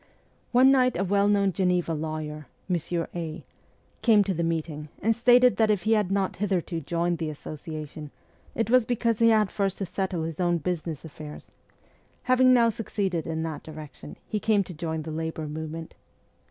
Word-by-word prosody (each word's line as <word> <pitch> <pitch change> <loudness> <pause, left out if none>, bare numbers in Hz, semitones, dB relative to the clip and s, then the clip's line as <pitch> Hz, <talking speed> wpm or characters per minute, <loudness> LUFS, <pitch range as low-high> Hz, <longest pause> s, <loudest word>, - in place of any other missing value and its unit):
One 255 +2 +6
night 255 -4 +3
a 190 - +1
well 200 +1 +2
known 200 -2 +3
Geneva 180 -3 +1
lawyer, 155 -1 -4 0.2
Monsieur 170 -1 -1
A., 165 -2 -5 0.6
came 215 -4 +5
to 195 -1 -1
the 170 - -2
meeting, 160 -2 -3
and 225 +2 +2
stated 245 +1 +5
that 220 -1 +3
if 205 -4 +1
he 220 - +1
had 210 -4 +2
not 195 -1 0
hitherto 180 -4 -1
joined 170 +2 -1
the 160 -2 -2
Association 155 0 -7 0.5
it 225 0 -1
was 255 -1 +6
because 230 -1 0
he 230 0 +6
had 215 -3 +3
first 195 -2 -1
to 195 - -3
settle 185 -2 -2
his 160 0 -5
own 175 -1 +2
business 165 -2 -4
affairs; 150 -1 -10 0.7
having 255 0 +5
now 235 -2 +5
succeeded 195 -7 -2
in 160 0 -2
that 160 -2 -4
direction, 150 - -10
he 215 - -2
came 205 -1 +2
to 180 - -9
join 160 -1 -3
the 160 - -6
labour 160 0 -4
movement. 160 +2 -6
175 Hz, 180 wpm, -26 LUFS, 160-210 Hz, 0.7 s, One